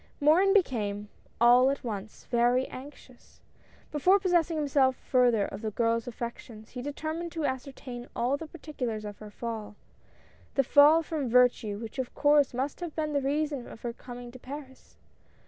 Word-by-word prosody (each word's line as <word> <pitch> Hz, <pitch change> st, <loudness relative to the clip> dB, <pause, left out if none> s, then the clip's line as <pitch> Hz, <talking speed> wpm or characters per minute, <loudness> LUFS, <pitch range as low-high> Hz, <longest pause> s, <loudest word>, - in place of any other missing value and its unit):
Morin 325 Hz, +7 st, +5 dB
became, 210 Hz, -, +1 dB, 0.3 s
all 245 Hz, +3 st, +6 dB
at 280 Hz, +1 st, -2 dB
once, 215 Hz, -3 st, -6 dB
very 245 Hz, +2 st, +3 dB
anxious. 260 Hz, -2 st, -13 dB, 0.5 s
Before 365 Hz, +7 st, +4 dB
pos 375 Hz, -2 st, -1 dB
sessing 335 Hz, -2 st, +3 dB
himself 280 Hz, -3 st, +2 dB
further 245 Hz, -6 st, +2 dB
of -, -, -7 dB
the 220 Hz, -, -2 dB
girl's 230 Hz, +2 st, 0 dB
affections 235 Hz, -2 st, -7 dB
he 250 Hz, -, -6 dB
deter 290 Hz, +3 st, -4 dB
mined 340 Hz, +1 st, -5 dB
to 325 Hz, -3 st, -2 dB
ascertain 260 Hz, -2 st, -5 dB
all 245 Hz, +4 st, +1 dB
the 320 Hz, +3 st, -7 dB
particulars 250 Hz, -9 st, -5 dB
of 205 Hz, -1 st, -8 dB
her 215 Hz, -, -9 dB
fall; 215 Hz, -1 st, -6 dB, 0.4 s
— -, -, -30 dB
the 275 Hz, -, +4 dB
fall 295 Hz, +5 st, +6 dB
from 300 Hz, -5 st, -3 dB
virtue 240 Hz, -4 st, +3 dB
which 225 Hz, +3 st, -7 dB
of 255 Hz, -, -4 dB
course 290 Hz, -1 st, +4 dB
must 265 Hz, +4 st, -3 dB
have 345 Hz, -3 st, -6 dB
been 305 Hz, -1 st, -2 dB
the 285 Hz, -, +1 dB
reason 285 Hz, -1 st, -1 dB
of -, -, -11 dB
her 240 Hz, -1 st, -4 dB
coming 245 Hz, 0 st, -9 dB
to 255 Hz, -, -12 dB
Paris. 265 Hz, 0 st, -10 dB
255 Hz, 175 wpm, -29 LUFS, 235-295 Hz, 0.5 s, all